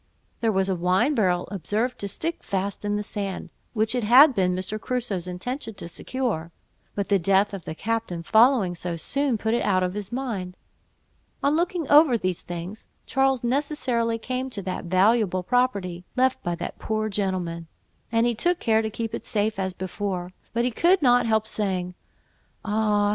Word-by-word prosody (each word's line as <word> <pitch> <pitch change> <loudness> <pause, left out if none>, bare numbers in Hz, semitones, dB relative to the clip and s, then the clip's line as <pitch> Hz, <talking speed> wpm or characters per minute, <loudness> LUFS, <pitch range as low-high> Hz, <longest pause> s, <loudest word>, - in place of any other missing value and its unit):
There 225 -2 +2
was 190 -1 +1
a 190 - +1
wine 185 - +2
barrel 185 -8 +1
observed 210 +7 -2
to 200 - -1
stick 330 - -2
fast 195 +1 -3
in 205 0 0
the 210 - -1
sand, 200 -2 -4 0.2
which 220 0 +1
it 245 -2 0
had 260 +7 +8
been 180 -4 +1
Mr. 190 +4 -4
Crusoe's 230 -8 -2
intention 225 +6 -5
to 170 - -7
secure; 175 -3 -3 0.4
but 200 -1 -2
the 200 -1 +4
death 195 +3 +3
of 190 -4 -7
the 160 - -5
captain 220 -5 -2
following 225 -3 +4
so 175 0 -4
soon, 275 - 0
put 220 +1 -1
it 240 - +1
out 185 -2 +2
of 180 0 -1
his 205 +1 -5
mind. 220 -8 -4 0.9
On 285 +2 +3
looking 340 -2 0
over 290 -4 +6
these 185 -4 -2
things, 175 +5 -7 0.2
Charles 270 -2 +1
necessarily 245 -3 0
came 255 +3 -3
to 205 -6 -6
that 185 -1 -4
valuable 185 +1 +3
property, 200 -7 0
left 260 0 +2
by 175 0 -2
that - - -6
poor 215 0 -1
gentleman, 185 -5 -2 0.4
and 230 0 +3
he 240 - +2
took 350 +10 +1
care 220 -2 +3
to 220 - -2
keep 225 +1 -4
it - - -4
safe 210 -1 0
as 190 -1 -1
before; 185 -1 -4 0.2
but 235 +1 0
he 250 - +1
could 345 +7 +3
not 245 -2 +4
help 220 -1 +2
saying—"Ah! 205 +2 -2
210 Hz, 180 wpm, -25 LUFS, 185-245 Hz, 0.9 s, had